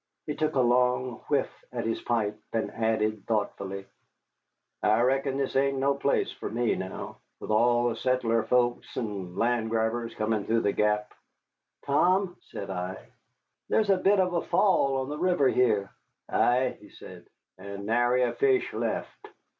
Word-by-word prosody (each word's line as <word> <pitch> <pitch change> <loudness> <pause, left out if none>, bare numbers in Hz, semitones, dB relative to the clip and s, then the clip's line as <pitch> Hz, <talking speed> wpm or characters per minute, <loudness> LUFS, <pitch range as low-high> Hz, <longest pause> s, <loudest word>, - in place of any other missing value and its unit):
He 150 - -3
took 155 0 -1
a - - +3
long 125 0 +2
whiff 140 -2 -1
at 120 -2 -3
his 115 - -2
pipe, 110 -3 -1
and 115 -1 -1
added 110 -2 -1
thoughtfully, 100 -3 -2 1.0
"I 110 +2 +3
reckon 135 +2 +1
this 135 -1 -2
ain't 135 0 +2
no 135 +1 +2
place 140 0 0
fer - - -6
me 120 0 0
now, 95 0 -6 0.2
with - - -5
all 120 +2 +3
the 115 - -3
settler 125 -3 +1
folks 120 +2 0
and 100 -6 -4
land 120 -1 +1
grabbers 115 +1 -1
comin' 110 -1 -1
through 115 0 +1
the 100 - +1
Gap." 105 0 0 0.7
"Tom," 180 +6 +2
said 100 -1 -6
I, 90 0 -4 0.7
"there's 215 -2 +3
a - - +5
bit 195 +2 +3
of 180 -1 +2
a 170 - +1
fall 140 -9 +2
on 130 - -5
the 150 +1 -5
river 175 -6 +3
here." 105 -7 +2 0.4
"Ay," 125 +1 +2
he - - -15
said, - - -13 0.3
"and 100 +1 -7
nary 120 +3 +2
a 125 - 0
fish 400 -2 +1
left." - - -4
120 Hz, 160 wpm, -27 LUFS, 110-135 Hz, 1.0 s, a